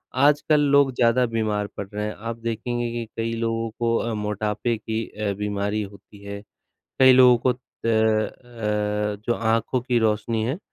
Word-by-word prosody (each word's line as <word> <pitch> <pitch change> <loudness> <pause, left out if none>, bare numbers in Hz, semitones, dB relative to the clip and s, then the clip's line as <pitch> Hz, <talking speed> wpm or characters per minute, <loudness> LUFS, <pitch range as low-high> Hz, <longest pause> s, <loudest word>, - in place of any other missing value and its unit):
आजकल 150 +2 +4
लोग 140 -1 +4
ज़्यादा 120 +1 +3
बीमार 110 -3 -1
पड़ 100 - -4
रहे 105 0 -2
हैं। 105 - -3
आप 115 +1 -6
देखेंगे 115 +1 -2
कि 120 0 -4
कई 115 0 -1
लोगों 115 0 -1
को 115 -1 +1
अ, 115 - -2
मोटापे 105 +2 -2
की 110 +1 -3
अ, 105 -1 -3
बीमारी 105 +1 -1
होती 100 0 -11
है, 100 0 -7 0.6
कई 130 -1 +8
लोगों 125 -1 +7
को 130 - +5
त 125 - -13 0.3
अ, 110 -2 0
जो 120 - +2
आँखों 115 +3 0
की 125 0 +1
रोशनी 110 0 0
है, 130 +8 -2
115 Hz, 170 wpm, -24 LUFS, 105-120 Hz, 0.6 s, कई